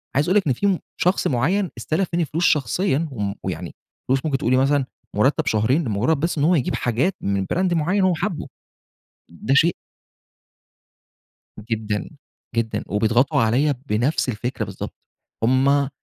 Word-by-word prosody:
عايز 150 Hz, +5 st, +2 dB
أقول 200 Hz, -, +4 dB
لِك 190 Hz, -, +1 dB
إن 130 Hz, -, +3 dB
في 195 Hz, +5 st, +1 dB, 0.2 s
شخص 180 Hz, +2 st, +2 dB
معيّن 170 Hz, +10 st, +1 dB
استلف 170 Hz, +4 st, -1 dB
مِنّي 170 Hz, -1 st, +1 dB
فلوس 165 Hz, +4 st, -2 dB
شخصيًا، 155 Hz, -, +1 dB
و 120 Hz, -, -8 dB
م 100 Hz, -1 st, -1 dB, 0.2 s
يعني -, -, -6 dB, 0.3 s
فلوس 130 Hz, +3 st, +1 dB
ممكن 140 Hz, -3 st, +1 dB
تقول 125 Hz, -, -1 dB
لي 130 Hz, -, +4 dB
مثلًا 135 Hz, 0 st, +2 dB, 0.3 s
مرتب 130 Hz, +8 st, +2 dB
شهرين، 125 Hz, +9 st, +2 dB
لمجرّد 120 Hz, +7 st, 0 dB
بس 165 Hz, +1 st, -1 dB
إن 145 Hz, -, +1 dB
هو 175 Hz, +3 st, +4 dB
يجيب 135 Hz, -, 0 dB
حاجات 125 Hz, -, 0 dB
من 100 Hz, -1 st, -1 dB
brand 185 Hz, 0 st, +1 dB
معيّن 175 Hz, +5 st, +1 dB
هو 185 Hz, -1 st, +4 dB
حابه. 175 Hz, -2 st, -3 dB, 0.8 s
ده 105 Hz, +10 st, -2 dB
شيء 165 Hz, +4 st, +4 dB, 2.0 s
جدًا، 110 Hz, -2 st, -2 dB, 0.5 s
جدًا، 110 Hz, -2 st, -1 dB
وبيضغطوا 115 Hz, +5 st, +2 dB
عليَّ 130 Hz, +7 st, +2 dB
بنفس 125 Hz, +5 st, 0 dB
الفكرة 120 Hz, +3 st, -3 dB
بالضبط. -, -, -7 dB, 0.5 s
هم 135 Hz, +3 st, +3 dB
135 Hz, 155 wpm, -22 LUFS, 115-165 Hz, 2.0 s, أقول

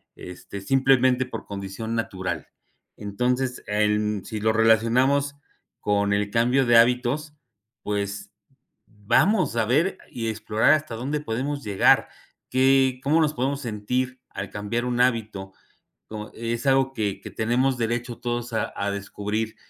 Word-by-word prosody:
este 90 Hz, +2 st, -9 dB
simplemente 130 Hz, +1 st, +3 dB
por 130 Hz, -, -7 dB
condición 100 Hz, +3 st, -5 dB
natural. 95 Hz, -5 st, -3 dB, 0.5 s
Entonces, 125 Hz, +5 st, -2 dB
em, 105 Hz, -1 st, 0 dB
si 110 Hz, -, -5 dB
lo 110 Hz, -, +3 dB
relacionamos 125 Hz, +6 st, +3 dB, 0.4 s
con 100 Hz, -1 st, +1 dB
el 100 Hz, 0 st, 0 dB
cambio 125 Hz, +3 st, +2 dB
de 120 Hz, -1 st, +5 dB
hábitos, 125 Hz, +6 st, +2 dB, 0.5 s
pues 100 Hz, -1 st, -3 dB, 0.5 s
vamos 120 Hz, -, +1 dB
a 110 Hz, -, +2 dB
ver 150 Hz, -, +1 dB
y 115 Hz, -2 st, -4 dB
explorar 110 Hz, +4 st, +2 dB
hasta 155 Hz, -6 st, -1 dB
dónde 140 Hz, +6 st, -3 dB
podemos 140 Hz, +3 st, -3 dB
llegar, 100 Hz, -2 st, +3 dB, 0.4 s
que 130 Hz, 0 st, +3 dB
cómo 155 Hz, +4 st, +3 dB
nos 150 Hz, -1 st, +1 dB
podemos 135 Hz, +2 st, -2 dB
sentir 125 Hz, +3 st, -2 dB
al -, -, -6 dB
cambiar 110 Hz, +4 st, -3 dB
un 125 Hz, 0 st, 0 dB
hábito 110 Hz, -6 st, -1 dB, 0.8 s
es 115 Hz, +2 st, -3 dB
algo 135 Hz, 0 st, +3 dB
que 105 Hz, -5 st, -2 dB
que -, -, -9 dB
tenemos 125 Hz, +3 st, 0 dB
derecho 120 Hz, +1 st, -2 dB
todos 120 Hz, 0 st, -3 dB
a 110 Hz, -, -2 dB
a 100 Hz, 0 st, -1 dB
descubrir 105 Hz, +2 st, -4 dB
120 Hz, 135 wpm, -24 LUFS, 105-130 Hz, 0.8 s, de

